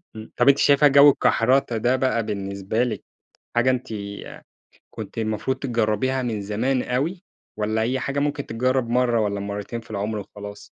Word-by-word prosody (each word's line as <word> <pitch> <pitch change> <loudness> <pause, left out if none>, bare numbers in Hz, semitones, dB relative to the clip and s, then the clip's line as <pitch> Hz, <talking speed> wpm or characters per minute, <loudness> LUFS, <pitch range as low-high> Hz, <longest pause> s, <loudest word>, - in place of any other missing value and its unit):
إمم، 110 0 -10
طب 125 +3 +5
أنتِ 140 - +5
شايفة 145 +1 +5
جو 140 +1 +8
الكحرتة 125 -2 +2
ده 125 +4 +2
بقى 130 -3 0
بالنسبة 100 +2 -2
لِك، 125 - -3 0.5
حاجة 120 +2 +3
أنتِ 130 0 -1 1.0
كنتِ - - -8
المفروض 110 +4 -1
تجربيها 120 +1 0
من 110 -4 -3
زمان 125 +6 0
أوي، 160 +9 -2 0.3
والَّا 110 +1 -1
هي 130 +3 0
حاجة 140 0 -3
ممكن 145 -1 -2
تتجرب 125 +1 0
مرّة، 120 -1 +2
والَّا 100 -1 -1
مرتين 100 +3 -5
في 110 - -20
العمر 105 +1 -3
وخلاص؟ 105 0 -10
120 Hz, 160 wpm, -23 LUFS, 105-130 Hz, 1.0 s, جو